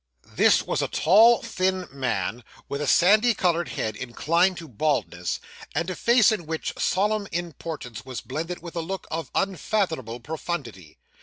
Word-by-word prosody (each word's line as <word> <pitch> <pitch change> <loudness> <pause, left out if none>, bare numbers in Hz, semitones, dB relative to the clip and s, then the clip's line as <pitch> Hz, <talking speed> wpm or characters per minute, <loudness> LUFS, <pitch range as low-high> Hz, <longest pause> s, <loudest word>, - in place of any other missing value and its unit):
This - - +4
was - - -1
a - - 0
tall, 225 +8 +5
thin 185 0 -1
man, 125 -4 -2 0.2
with 140 +1 -4
a 150 - -2
sandy 215 - +5
coloured 175 -2 +1
head 110 -1 -3
inclined 170 - +1
to 165 - -8
baldness, 120 - -1 0.4
and 170 +4 -1
a - - -4
face 235 +4 +4
in 175 -7 -3
which 160 0 -3
solemn 205 +2 0
importance 160 -8 -5
was 130 -2 -6
blended 165 +7 -5
with 170 0 -8
a 170 - -1
look 190 +4 -5
of 165 0 -3
unfathomable 165 - -1
profundity. 120 - -6
165 Hz, 155 wpm, -25 LUFS, 130-185 Hz, 0.4 s, tall